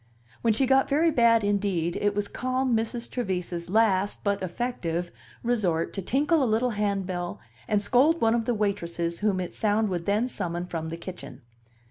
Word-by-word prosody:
When 230 - +3
she 225 +5 +2
got 265 +1 +3
very 315 +4 +3
bad 230 -4 +4
indeed, 195 -5 0
it 205 0 +1
was 205 0 -1
calm 255 -1 0
Mrs. 230 +1 -2
Trevise's 180 -7 -3
last, 205 -2 +2
but 200 -1 0
effective, 175 -4 -3 0.3
resort 195 -9 0
to 195 - -3
tinkle 285 - +2
a 250 - +1
little 235 +3 +1
handbell 195 -4 -2 0.3
and 210 -1 +1
scold 280 +10 +4
one 225 -3 +3
of 235 -1 0
the 245 - 0
waitresses 170 -5 -2
whom 205 -3 +1
its 180 - -5
sound 215 0 +2
would 175 -2 -3
then 210 +5 +2
summon 175 -7 -3
from 165 -2 -4
the 165 - -5
kitchen. 170 -8 -9
205 Hz, 175 wpm, -26 LUFS, 180-235 Hz, 0.3 s, bad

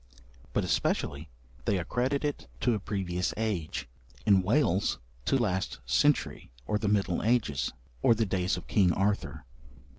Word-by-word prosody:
But - - +1
especially 75 +2 -1 0.4
they 100 - +2
accredit 125 - 0
it 145 - -3
to 120 - +3
a 110 - -1
previous 90 -3 -2
age: 105 -8 -2 0.4
in 100 -2 +6
Wales, 100 - +2 0.3
to - - +3
last 95 -6 -1
century, 140 - +1
or 105 - 0
the 105 - -1
middle 100 -4 +1
ages, 105 - +1 0.3
or 115 - +5
the 110 0 +1
days 95 -1 0
of - - -8
King 95 -4 +3
Arthur. 100 -6 -1
100 Hz, 145 wpm, -29 LUFS, 90-115 Hz, 0.4 s, in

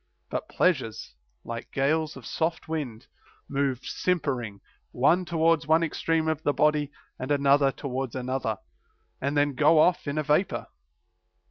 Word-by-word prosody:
But - - -3
pleasures, 130 - 0 0.3
like 115 0 -6
gales 155 +3 0
of - - -11
soft 165 +1 -2
wind, 140 -9 -4 0.4
move 140 -3 -1
simpering, 130 - -1 0.3
one 170 +8 +2
towards 165 -1 +2
one 160 +2 +4
extreme 165 0 0
of 160 -1 0
the 145 - +1
body 150 -1 +2 0.3
and 130 - -4
another 140 -1 +4
towards 130 -2 -4
another, 130 -4 -2 0.6
and 140 +2 -1
then 145 0 +2
go 150 +4 +4
off 175 +1 +3
in 140 +1 -2
a 155 - +1
vapor. 150 +6 +1
145 Hz, 140 wpm, -27 LUFS, 135-160 Hz, 0.6 s, one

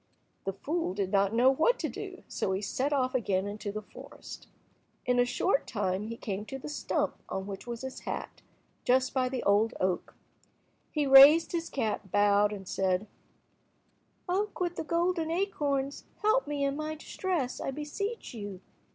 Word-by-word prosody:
The 195 - -1
fool 295 - -2
did 195 -2 -1
not 200 -1 +3
know 245 +4 +5
what 320 - +3
to - - -2
do, - - -7
so 190 - -1
he 190 - -1
set 260 +8 -1
off 260 -3 +1
again 205 -4 0
to 205 - -4
the 215 +1 -5
forest. - - -11 0.6
In 250 0 +2
a 245 - +5
short 260 +2 +1
time 200 -1 -1
he 230 +1 -6
came 200 -2 -4
to 270 - -6
the 270 - -7
stump 295 - -1
on 190 - -3
which 195 +2 -7
was 235 -1 -5
his 265 0 -6
hat, - - -6 0.4
just 255 +1 +2
by 255 -1 +1
the 255 -1 -3
old 210 +3 +3
oak. 185 -1 -1 0.7
He 300 -2 0
raised 275 +4 +9
his 335 -1 -2
cap, 215 -6 -2
bowed, 205 0 +4
and 195 -3 -7
said— 190 +1 0 1.2
"Oak 400 +4 -1
with 350 -1 -1
the - - -3
golden 335 0 0
acorns, 290 -7 -1 0.2
help 435 +1 +3
me 290 -1 -1
in 275 0 0
my 305 +1 -3
distress, 315 - -2
I - - -2
beseech 300 - -4
you. 205 -4 -6
255 Hz, 175 wpm, -30 LUFS, 205-305 Hz, 1.2 s, raised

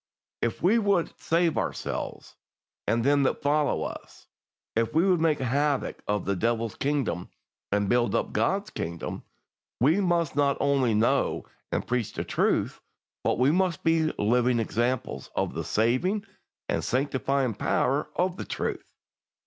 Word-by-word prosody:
If 115 +5 -2
we 210 +7 +5
would 200 -5 +1
save 165 0 +1
ourselves - - -4 0.5
and 115 0 +2
them 140 +2 +4
that 135 - 0
follow 150 +1 +2
us, - - -8 0.5
if 115 +6 0
we 170 +4 +4
would 180 -4 +3
make 160 -2 +3
havoc 140 +2 0
of 105 -2 0
the 100 - 0
Devil's 115 +2 0
kingdom 135 - -1 0.4
and 100 0 +1
build 120 +2 +2
up - - -1
God's 200 +2 0
kingdom, 85 0 -4 0.6
we 155 - +4
must 170 -4 +1
not 140 -1 +2
only 135 -5 +2
know 110 +3 +1 0.3
and - - -1
preach 125 -3 -1
the - - -3
truth, - - 0 0.4
but - - +1
we 130 +4 +4
must 180 -1 +1
be 165 -1 +3
living 120 +3 +2
examples 120 +2 -1
of - - -1
the - - -3
saving 130 - +1 0.4
and - - -1
sanctifying 135 -1 0
power 135 +7 0
of 180 0 0
the - - -5
truth. - - -4
140 Hz, 150 wpm, -27 LUFS, 115-165 Hz, 0.6 s, we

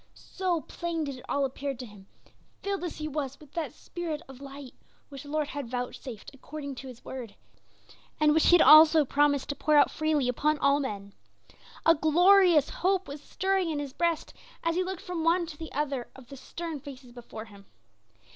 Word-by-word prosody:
So 360 -4 -2
plain 335 -1 -4
did 280 -3 -5
it - - -14
all 280 -1 +1
appear 275 +1 -4
to 250 +1 -8
him, 205 -3 -15 0.6
filled 395 -2 -2
as 350 - -4
he 305 - -4
was 275 -2 -4
with 295 -3 -16
that 330 -2 -3
spirit 335 -3 -5
of 270 0 -13
light 275 -1 -10 0.4
which 275 -2 -9
the 285 - -12
Lord 300 -1 -1
had 280 -4 -5
vouchsafed 245 -1 -6
according 280 +1 -7
to 270 - -8
his 250 -1 -12
word, 240 -6 -7 0.8
and 300 0 +4
which 315 - +3
he 350 - +8
had 350 - +6
also 310 0 +8
promised 285 0 +2
to 285 - -2
pour 305 +1 +1
out 290 - +5
freely 310 -4 0
upon 300 +5 +1
all 280 0 +3
men. 200 -7 -5 0.7
A 330 - +7
glorious 345 0 +5
hope 380 +1 0
was 285 +1 -8
stirring 380 +1 -1
in 310 - -2
his 285 -2 -5
breast 335 0 -1 0.3
as 335 0 +1
he 365 +2 +1
looked 375 -1 -5
from 350 -3 -4
one 340 +2 +3
to 320 -2 -9
the 320 +1 -8
other 275 -4 -2
of 260 -2 -14
the 275 - -9
stern 325 +3 -6
faces 265 -3 -11
before 235 -2 -9
him. 200 -3 -16
295 Hz, 200 wpm, -28 LUFS, 270-330 Hz, 0.8 s, he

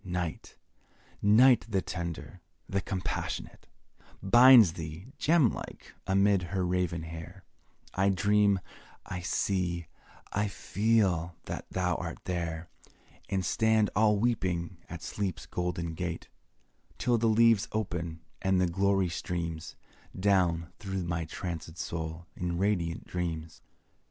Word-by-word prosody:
Night 90 -3 -4 0.7
Night 120 +4 +6
the 95 -3 0
tender, 85 -1 -6 0.3
the 95 0 -1
compassionate, 95 0 -4 0.6
Binds 120 -3 +8
thee, 85 - -8
gem 155 -7 +4
like, - - -9
amid 100 0 +3
her 90 +1 -2
raven 90 -2 -1
hair; 85 +3 -9 0.5
I 95 +1 +2
dream 100 +1 +3 0.5
I 90 - -5
see 90 -1 -1 0.5
I 105 +1 +1
feel 95 -5 +1
that - - -6
thou 90 -2 0
art - - -5
there 85 -2 -3 0.6
And 95 -2 0
stand 110 +1 +2
all 105 +1 +4
weeping 95 -6 -1
at 85 -2 -7
Sleep's 100 -5 -3
golden 85 -2 -3
gate, 85 0 -4 0.7
Till 120 -2 +2
the 115 - +2
leaves 115 -1 +4
open, 85 -6 -3 0.2
and 95 -1 +2
the 90 - +3
glory 95 +2 +2
streams 85 -2 -4 0.4
Down 90 -4 +2
through 95 -4 -3
my 85 -1 -2
trancèd 85 -1 -6
soul 80 0 -4
in 85 -1 -2
radiant 90 -4 0
dreams. 80 -3 -4
90 Hz, 120 wpm, -30 LUFS, 85-100 Hz, 0.7 s, Binds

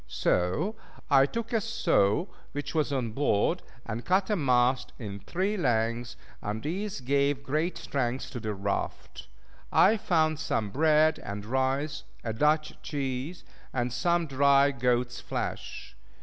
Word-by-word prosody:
So 90 - 0 0.4
I 135 0 +6
took 230 - -4
a 225 - +2
saw 200 - +2 0.3
which 145 0 -4
was 155 -3 +1
on 125 -5 -1
board, 140 - +1 0.2
and 115 +1 -4
cut 190 +3 +2
a - - +3
mast 125 -4 +2
in 100 -4 -6
three 190 - -1
lengths, 115 - 0 0.2
and 105 +2 -4
these 190 +3 -3
gave 140 +2 +1
great 155 +6 -1
strength 130 -2 -2
to 120 - -5
the 110 -2 -3
raft. 100 +1 -4 0.4
I 215 +4 +5
found 155 -5 +1
some 110 -9 -1
bread 155 +3 +4
and 100 0 -6
rice, 135 +5 -1 0.2
a 115 - -2
Dutch 150 +5 +2
cheese, 140 +3 -4 0.3
and 125 -1 -1
some 170 +7 +1
dry 140 0 +4
goat's 125 -1 0
flesh. - - -5
140 Hz, 140 wpm, -28 LUFS, 120-160 Hz, 0.4 s, I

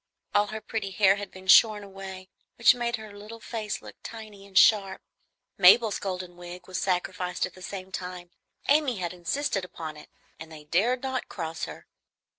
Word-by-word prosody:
All 205 0 +3
her 215 +1 -6
pretty 215 -1 -4
hair 195 0 +4
had 205 0 -6
been 185 0 -13
shorn 210 +2 +6
away, 190 -1 -9 0.3
which 240 +1 +6
made 240 -1 -1
her 215 -3 -10
little 215 +3 -10
face 220 -3 -4
look - - -11
tiny 215 -3 -10
and 190 -1 -4
sharp. 195 -3 +5 0.6
Mabel's 205 +4 +6
golden 180 -2 -5
wig 175 0 -10
was 185 -1 -3
sacrificed 180 -1 -1
at 180 - -9
the 185 - -15
same 190 0 -7
time. 180 -2 -6 0.4
Amy 285 -5 +3
had 180 -1 -3
insisted 195 - -1
upon 160 -4 -7
it, 150 - -13 0.3
and 160 +1 -10
they 155 -1 -10
dared 220 - +1
not 260 -1 -3
cross 165 -3 -4
her. - - -10
195 Hz, 180 wpm, -27 LUFS, 180-220 Hz, 0.6 s, shorn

